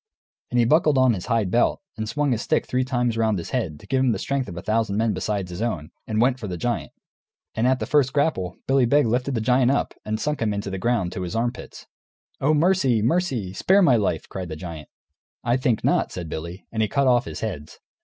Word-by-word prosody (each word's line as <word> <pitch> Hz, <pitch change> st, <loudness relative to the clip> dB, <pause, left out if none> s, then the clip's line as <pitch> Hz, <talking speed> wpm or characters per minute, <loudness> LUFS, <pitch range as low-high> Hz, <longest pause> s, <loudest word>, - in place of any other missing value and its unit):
And 125 Hz, -, -1 dB
he 120 Hz, -, +4 dB
buckled 150 Hz, +2 st, +4 dB
on 130 Hz, -2 st, +5 dB
his 90 Hz, -4 st, -5 dB
hide 115 Hz, -6 st, +1 dB
belt, 120 Hz, -, +2 dB, 0.2 s
and 110 Hz, -1 st, -4 dB
swung 145 Hz, +3 st, 0 dB
his 115 Hz, -2 st, 0 dB
stick -, -, 0 dB
three 125 Hz, +1 st, 0 dB
times 125 Hz, -3 st, -1 dB
round 110 Hz, -2 st, +2 dB
his 85 Hz, -, -6 dB
head, 90 Hz, -, -2 dB
to -, -, -15 dB
give 135 Hz, 0 st, 0 dB
him 130 Hz, -3 st, +3 dB
the -, -, -2 dB
strength 135 Hz, +2 st, -2 dB
of 85 Hz, -, -8 dB
a -, -, -4 dB
thousand 110 Hz, -2 st, 0 dB
men 110 Hz, 0 st, +1 dB
besides 100 Hz, -4 st, -2 dB
his 90 Hz, +4 st, -6 dB
own, 90 Hz, -11 st, -3 dB, 0.2 s
and 110 Hz, -1 st, -1 dB
went 125 Hz, +2 st, +2 dB
for 110 Hz, -, -5 dB
the 90 Hz, -2 st, -4 dB
giant. 120 Hz, +7 st, -2 dB, 0.6 s
And 115 Hz, +3 st, +1 dB
at 130 Hz, 0 st, +3 dB
the -, -, -3 dB
first 145 Hz, -3 st, +2 dB
grapple 140 Hz, -, 0 dB
Billy 135 Hz, -1 st, +3 dB
Beg 145 Hz, +3 st, +4 dB
lifted 125 Hz, +4 st, 0 dB
the 115 Hz, -, 0 dB
giant 125 Hz, +2 st, +3 dB
up 140 Hz, -, 0 dB
and 110 Hz, 0 st, -3 dB
sunk 150 Hz, +1 st, -2 dB
him 105 Hz, -2 st, 0 dB
in 100 Hz, -, -2 dB
the 95 Hz, -2 st, -5 dB
ground, 105 Hz, -4 st, 0 dB
to -, -, -5 dB
his 90 Hz, +2 st, -4 dB
armpits. 120 Hz, +2 st, -4 dB, 0.5 s
"Oh, 155 Hz, +3 st, +3 dB
mercy! 150 Hz, -, +3 dB
mercy! 125 Hz, -, 0 dB
Spare 190 Hz, -, +4 dB
my 135 Hz, -8 st, +5 dB
life!" 105 Hz, -4 st, 0 dB
cried 95 Hz, -2 st, -6 dB
the 80 Hz, -, -5 dB
giant. 80 Hz, -3 st, -8 dB, 0.5 s
"I 120 Hz, 0 st, +2 dB
think 125 Hz, -4 st, 0 dB
not," -, -, +2 dB
said 85 Hz, -3 st, -6 dB
Billy; 85 Hz, +5 st, -6 dB
and 110 Hz, -, -1 dB
he 110 Hz, -, +2 dB
cut 140 Hz, +6 st, +1 dB
off 125 Hz, 0 st, +3 dB
his -, -, -7 dB
heads. 90 Hz, -9 st, -5 dB
115 Hz, 245 wpm, -24 LUFS, 100-130 Hz, 0.6 s, on